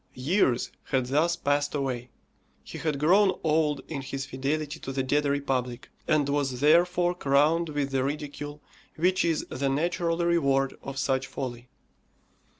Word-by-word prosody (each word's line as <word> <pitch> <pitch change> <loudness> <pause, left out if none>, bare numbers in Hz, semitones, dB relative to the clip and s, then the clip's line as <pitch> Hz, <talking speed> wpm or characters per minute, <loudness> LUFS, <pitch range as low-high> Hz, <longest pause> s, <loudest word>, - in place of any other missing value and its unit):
Years 130 - +1
had 130 -2 0
thus 155 +7 +2
passed 145 -2 0
away. 125 -3 -2 0.5
He - - -8
had 155 -3 -1
grown 190 +6 +4
old 155 -2 +1
in 145 -4 -4
his 135 0 -5
fidelity 145 +4 -3
to 135 - -6
the 135 0 -1
dead 145 +3 +1
republic, 135 -3 -2 0.2
and 155 -3 +2
was 140 -3 -1
therefore 175 +4 +4
crowned 155 +1 +2
with 145 -2 -2
the 135 -1 +1
ridicule 145 +1 -5 0.3
which 185 +3 +2
is 165 -2 0
the 135 +2 -1
natural 165 +3 0
reward 140 -6 +1
of 135 0 -7
such 135 -1 0
folly. 125 -2 -6
145 Hz, 150 wpm, -27 LUFS, 135-160 Hz, 0.5 s, grown